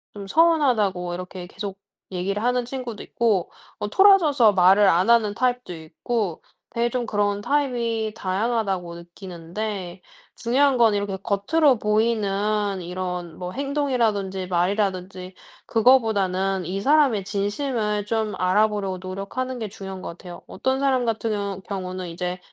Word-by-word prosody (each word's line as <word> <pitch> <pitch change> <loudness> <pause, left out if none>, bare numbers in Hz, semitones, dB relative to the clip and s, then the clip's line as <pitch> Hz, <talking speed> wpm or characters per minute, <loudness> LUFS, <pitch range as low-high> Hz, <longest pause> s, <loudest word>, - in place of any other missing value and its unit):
"좀 200 - -7
서운하다."고 230 - +2
이렇게 180 0 -7
계속 195 0 -7 0.3
얘기를 190 +3 -2
하는 245 0 +1
친구도 250 -4 -6
있고 215 -7 0 0.3
뭐 205 - -2
토라져서 310 - +5
말을 195 +2 +5
안 185 +4 +3
하는 220 -3 +4
타입도 250 -5 -1
있고 175 +4 -3 0.3
되게 235 0 0
좀 245 0 -2
그런 205 -2 0
타입이 235 -5 -1
다양하다고 195 -3 -1
느끼는데 180 +2 -7 0.3
중요한 265 +3 +2
건 230 -3 +5
이렇게 200 -1 -1
겉으로 245 +6 +2
보이는 210 -2 0
이런 180 -1 -5
뭐 180 0 -5
행동이라든지 235 -9 -1
말이이라든지 185 0 -1 0.3
그거보다는 200 -6 +2
이 190 +4 -3
사람의 275 -6 +3
진심을 210 +1 -2
좀 220 -1 -1
알아보려고 195 0 +1
노력하는 195 +8 -5
게 220 -2 -4
중요한 195 -2 -8
것 - - -6
같아요. 175 +1 -10
어떤 265 +1 -1
사람 260 -3 +2
같은 225 0 -1
경우 200 -2 -3
경우는 185 -2 -5
이제 180 +2 -4
205 Hz, 330 characters per minute, -23 LUFS, 185-235 Hz, 0.3 s, 토라져서